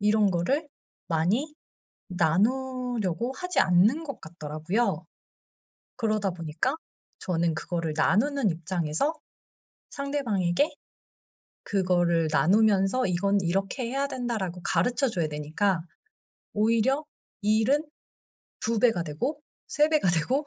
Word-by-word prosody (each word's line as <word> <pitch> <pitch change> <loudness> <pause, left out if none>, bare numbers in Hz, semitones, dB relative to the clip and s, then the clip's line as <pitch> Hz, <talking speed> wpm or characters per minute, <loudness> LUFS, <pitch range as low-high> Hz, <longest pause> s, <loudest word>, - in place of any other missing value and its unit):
이런 210 0 +3
거를 270 - 0 0.4
많이 205 - 0 0.5
나누려고 235 +4 0
하지 360 +5 -3
않는 210 - +4
것 280 -5 -7
같더라고요. 165 +4 -2 0.9
그러다 215 -5 0
보니까 165 - -2 0.4
저는 170 -2 0
그거를 165 -1 -3
나누는 230 - +2
입장에서 170 - -1 0.8
상대방에게 275 - 0 1.0
그거를 175 -4 +1
나누면서 200 +6 +3
"이건 195 +3 +1
이렇게 195 +7 -1
해야 275 +2 0
된다."라고 220 -9 -3
가르쳐 250 +1 +1
줘야 170 -7 -1
되니까 155 +5 -1 0.7
오히려 230 +7 +2 0.4
일은 220 +9 +2 0.8
2 225 0 0
배가 225 -8 +3
되고 255 - -3 0.3
3 300 0 +3
배가 300 - +3
되고 255 - 0
205 Hz, 240 characters per minute, -27 LUFS, 175-255 Hz, 1.0 s, 않는